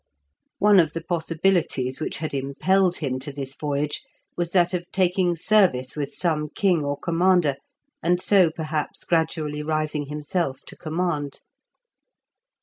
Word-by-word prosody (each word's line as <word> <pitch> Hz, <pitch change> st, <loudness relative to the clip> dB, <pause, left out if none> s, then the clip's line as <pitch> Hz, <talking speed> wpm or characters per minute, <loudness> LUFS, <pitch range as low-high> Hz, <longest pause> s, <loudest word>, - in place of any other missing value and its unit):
One 205 Hz, -1 st, +6 dB
of 160 Hz, -3 st, +2 dB
the 165 Hz, -, -5 dB
possibilities 165 Hz, -6 st, 0 dB
which 155 Hz, -, -3 dB
had 155 Hz, -2 st, -4 dB
impelled 175 Hz, +7 st, +1 dB
him 130 Hz, -4 st, -2 dB
to 140 Hz, +3 st, -7 dB
this 135 Hz, -1 st, -5 dB
voyage 145 Hz, 0 st, -2 dB, 0.3 s
was 175 Hz, -1 st, -2 dB
that 175 Hz, 0 st, +2 dB
of 175 Hz, -1 st, -4 dB
taking 180 Hz, -1 st, +2 dB
service 165 Hz, -9 st, +2 dB
with 145 Hz, -2 st, -3 dB
some 155 Hz, -4 st, -1 dB
king 180 Hz, -4 st, +1 dB
or 145 Hz, 0 st, -2 dB
commander, 170 Hz, -4 st, +2 dB, 0.4 s
and 175 Hz, +1 st, +2 dB
so 185 Hz, -2 st, +4 dB
perhaps 155 Hz, -1 st, -4 dB
gradually 160 Hz, -3 st, 0 dB
rising 155 Hz, -1 st, -1 dB
himself 150 Hz, -1 st, -2 dB
to -, -, -10 dB
command. 155 Hz, -3 st, -3 dB
160 Hz, 140 wpm, -24 LUFS, 145-175 Hz, 0.4 s, One